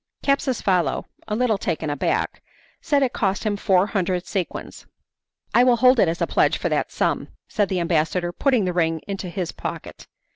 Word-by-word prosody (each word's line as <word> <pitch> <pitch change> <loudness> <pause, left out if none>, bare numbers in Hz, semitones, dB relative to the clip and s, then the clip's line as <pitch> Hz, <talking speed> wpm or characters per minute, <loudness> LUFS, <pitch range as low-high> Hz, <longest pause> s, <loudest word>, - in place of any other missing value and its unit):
Capsucefalo, 215 - +1 0.2
a 210 - -1
little 225 -3 +1
taken 160 -4 -2
aback, 145 - -1 0.4
said 290 -4 +2
it 255 - 0
cost 195 -2 0
him 210 -2 0
four 190 -2 +3
hundred 185 -4 -1
sequins. 190 -4 -5 0.7
"I 245 - +6
will 250 -1 +5
hold 255 +1 +5
it 190 - +5
as 165 +1 -1
a - - +3
pledge - - +2
for - - -2
that - - -1
sum," - - -1 0.2
said 205 -3 0
the 190 -2 0
ambassador, 170 +1 0
putting 250 +2 +1
the 180 - -1
ring 165 -2 0
into 195 -2 -4
his 180 -1 -3
pocket. - - -7
190 Hz, 180 wpm, -23 LUFS, 175-230 Hz, 0.7 s, I